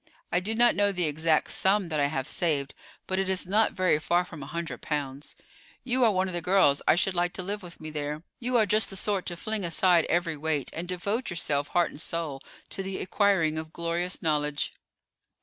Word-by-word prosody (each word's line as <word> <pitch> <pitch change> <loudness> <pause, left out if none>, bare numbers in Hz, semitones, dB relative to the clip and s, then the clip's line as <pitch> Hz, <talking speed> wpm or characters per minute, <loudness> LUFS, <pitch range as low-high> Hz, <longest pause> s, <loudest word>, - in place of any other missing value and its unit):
I 175 - +3
do 210 +5 -2
not 240 +1 +5
know 205 0 +3
the 180 -2 -1
exact 155 +1 +1
sum 195 -1 +2
that 155 -2 -1
I 140 - +3
have 135 -2 -3
saved, 145 -5 0 0.3
but 190 0 -1
it 195 0 0
is 190 -1 +1
not 210 +4 +2
very 185 -5 +2
far 175 +3 +1
from 165 -4 -10
a 135 - -7
hundred 170 +2 -5
pounds. 145 -2 -4 0.5
You 255 0 +1
are 225 - +5
one 190 -1 +1
of 185 - -5
the 175 - -2
girls 170 -5 +4
I - - +6
should 185 +2 +1
like 175 0 0
to 185 - -5
live 205 +3 -4
with 175 -2 -11
me 155 0 -7
there. 150 +1 -4 0.2
You 250 0 +1
are 220 - +4
just 215 +2 +2
the 195 - -7
sort 195 -1 -1
to 175 - -3
fling 215 +3 -3
aside 175 0 +4
every 170 -2 0
weight, 150 -3 -1
and 170 +2 -5
devote 200 +7 -2
yourself 145 -5 -1
heart 175 -1 +1
and 150 - -6
soul 160 -5 -3 0.3
to 195 - -4
the 195 0 -4
acquiring 185 -5 +2
of 160 0 -7
glorious 170 +2 -2
knowledge." 150 -2 0
175 Hz, 220 wpm, -28 LUFS, 155-195 Hz, 0.5 s, I